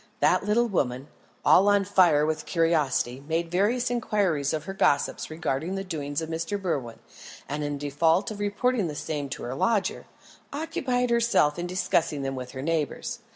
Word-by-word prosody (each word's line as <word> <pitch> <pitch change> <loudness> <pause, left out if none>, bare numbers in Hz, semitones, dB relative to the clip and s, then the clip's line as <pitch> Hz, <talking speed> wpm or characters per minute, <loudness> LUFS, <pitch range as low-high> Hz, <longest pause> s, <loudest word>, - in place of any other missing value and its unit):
That 180 0 +3
little 220 +4 +2
woman, 135 - -1 0.4
all 195 - +6
on 205 -1 +4
fire 175 -6 +4
with 155 0 -2
curiosity, 150 -6 +1
made 165 +1 -1
various 235 +7 +1
inquiries 200 - 0
of 155 -1 -2
her 195 - -6
gossips 145 -6 +1
regarding 160 +2 -2
the 195 - -3
doings 150 -4 -3
of - - -4
Mr. 165 +5 -3
Berwin, 135 - -3 0.5
and 150 +2 -3
in 145 -1 -2
default 160 +7 +1
of 210 - -7
reporting 205 +1 0
the 150 - -5
same 145 -1 -4
to - - -6
her 120 - -4
lodger, 205 - 0 0.4
occupied 255 -5 -1
herself 230 -10 +3
in 175 - -3
discussing 170 -5 0
them 135 0 -2
with 125 -1 -7
her 130 0 -5
neighbours. 165 +9 -2
165 Hz, 170 wpm, -26 LUFS, 145-205 Hz, 0.5 s, all